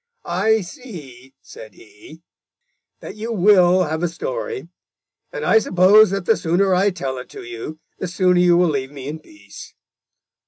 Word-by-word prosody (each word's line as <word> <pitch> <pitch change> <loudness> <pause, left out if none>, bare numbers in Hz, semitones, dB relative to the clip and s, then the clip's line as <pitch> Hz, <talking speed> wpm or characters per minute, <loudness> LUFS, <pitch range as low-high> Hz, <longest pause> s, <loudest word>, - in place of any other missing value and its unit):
"I 215 +5 +1
see," 155 - -12
said 110 -2 -13
he, 110 +10 -17 0.8
"that - - -9
you 220 +2 -6
will 185 -3 +4
have 160 0 -3
a 175 - +1
story, 155 -2 -5 0.6
and 150 - -5
I 220 - +5
suppose 200 +2 +5
that 195 -1 -3
the - - +3
sooner 180 +3 +1
I 190 +3 +3
tell 135 -9 -5
it 125 - -11
to - - -10
you, 120 +6 -8 0.2
the 185 - -3
sooner 180 0 +1
you 175 -1 +4
will 175 -1 +3
leave 135 -3 -3
me 140 -2 -9
in 155 +2 -6
peace. 315 - -14
175 Hz, 165 wpm, -20 LUFS, 145-195 Hz, 0.8 s, I